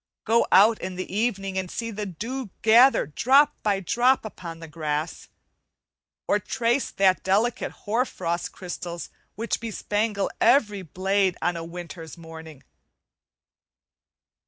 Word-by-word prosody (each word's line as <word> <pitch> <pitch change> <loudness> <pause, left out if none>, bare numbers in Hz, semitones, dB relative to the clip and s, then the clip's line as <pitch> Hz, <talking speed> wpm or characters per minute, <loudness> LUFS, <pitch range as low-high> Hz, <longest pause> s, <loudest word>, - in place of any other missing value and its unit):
Go 230 +1 +3
out 215 +3 +6
in 185 0 -5
the 185 +1 -5
evening 195 -4 -1
and 185 -1 -5
see 230 +4 -4
the 210 -1 -4
dew 230 +7 -5
gather 235 +5 +6
drop 265 - +3
by 205 -2 +1
drop 240 +7 +2
upon 170 -6 -8
the 165 - -9
grass, 155 0 -4 1.0
or 205 - +2
trace 235 +5 0
the 190 -1 +3
delicate 210 +6 0
hoar 225 +4 +2
frost 170 -8 -3
crystals 175 -1 -7 0.3
which 230 +3 -2
bespangle 210 -2 -2
every 210 -7 +3
blade 190 +2 0
on 175 +1 0
a 165 - -5
winter's 170 -2 -9
morning. 160 -3 -11
195 Hz, 130 wpm, -25 LUFS, 175-225 Hz, 1.0 s, out